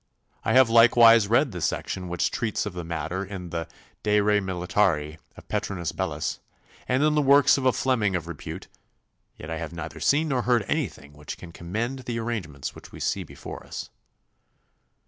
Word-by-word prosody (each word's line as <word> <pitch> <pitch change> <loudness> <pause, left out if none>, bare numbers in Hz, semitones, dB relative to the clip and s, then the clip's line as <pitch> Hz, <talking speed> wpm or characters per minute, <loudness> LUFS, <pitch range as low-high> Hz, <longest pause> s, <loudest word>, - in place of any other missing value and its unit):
I - - +1
have 130 -1 +7
likewise 115 -1 +7
read 120 +5 +3
the 90 -3 -6
section 90 +3 -2
which 90 -1 -1
treats 110 -3 -1
of 105 - -4
the 90 -1 -5
matter 85 +3 -3
in 95 -3 -7
the 85 -1 -3 0.3
"De 105 0 +3
re 105 0 +3
militari" 90 -5 0 0.2
of - - -14
Petrinus 90 -4 -2
Bellus, - - -3 0.5
and 130 +3 +2
in 155 0 +3
the 150 - +3
works 140 0 +6
of 130 - +1
a - - +6
Fleming 115 -8 +1
of 85 -2 -3
repute, 85 -4 -7 0.7
yet 75 - -8
I 80 - -2
have 80 0 -6
neither 80 -2 -7
seen 155 +3 +2
nor 130 -3 +1
heard 120 -4 +2
anything 70 - -3
which 75 0 -8
can 85 - -11
commend 110 +11 -4
the 120 -2 -4
arrangements 95 - -4
which - - -13
we - - -10
see - - -1
before - - -9
us. - - -7
100 Hz, 185 wpm, -26 LUFS, 85-120 Hz, 0.7 s, have